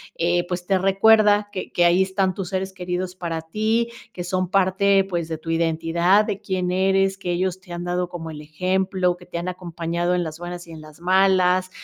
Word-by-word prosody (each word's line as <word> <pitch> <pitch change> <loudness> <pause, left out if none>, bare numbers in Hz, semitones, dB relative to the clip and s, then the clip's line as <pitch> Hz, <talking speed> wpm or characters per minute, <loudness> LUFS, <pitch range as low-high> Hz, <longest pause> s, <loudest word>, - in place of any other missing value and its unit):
eh, 175 +1 +1
pues 180 0 -4
te 195 +1 +2
recuerda 205 +2 +4
que 190 -2 -6
que 175 - +3
ahí 175 +2 +4
están 190 0 +1
tus 190 -2 -5
seres 190 0 -2
queridos 180 0 -4
para 170 -3 -4
ti, 215 +7 0 0.2
que 175 - -5
son 185 0 -1
parte 195 +1 +3
pues 170 -3 -2
de 160 -1 -4
tu 165 +1 -9
identidad, 165 +4 +2
de 200 - -3
quién 185 -3 -2
eres, 195 +1 +2
que 180 -2 -3
ellos 185 +1 -1
te 180 -1 -16
han 175 - -5
dado 175 0 -2
como 165 -2 -7
el 150 -1 -8
ejemplo, 185 +3 0
que 180 - -15
te 175 - -6
han 170 +1 -4
acompañado 175 -1 -2
en 175 - 0
las 160 0 -7
buenas 175 0 -7
y - - -11
en 160 -1 -9
las 155 +1 -14
malas, 185 0 +3
180 Hz, 215 wpm, -22 LUFS, 175-190 Hz, 0.2 s, recuerda